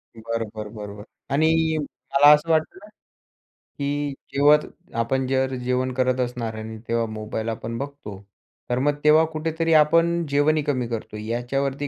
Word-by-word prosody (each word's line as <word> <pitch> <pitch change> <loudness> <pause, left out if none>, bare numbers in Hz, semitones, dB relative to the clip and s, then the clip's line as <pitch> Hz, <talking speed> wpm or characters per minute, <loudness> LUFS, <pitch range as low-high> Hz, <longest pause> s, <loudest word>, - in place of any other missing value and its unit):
बरोबर, 110 -1 -5
बरोबर 105 -1 -9 0.3
आणि 160 +2 +2
मला 145 0 +3
असं 150 +2 +1
वाटतं 160 +1 +1
ना, - - -12 0.7
की 145 0 -4 0.2
जेवत 145 +2 +5 0.4
आपण 130 +3 -1
जर 130 0 0
जेवण 125 +1 0
करत 130 0 +1
असणार 120 -3 -2
आणि 110 0 -7
तेव्हा 115 0 +1
मोबाईल 110 +1 -4
आपण 115 +1 -4
बघतो, 140 -7 -7 0.5
तर 125 0 0
मग 145 +2 +1
तेव्हा 155 +1 +6
कुठेतरी 160 +1 -1
आपण 165 +2 +4
जेवणही 145 +2 +2
कमी 130 -4 -1
करतो. 115 -2 -5
याच्यावरती 135 +6 -2
135 Hz, 140 wpm, -23 LUFS, 115-150 Hz, 0.7 s, तेव्हा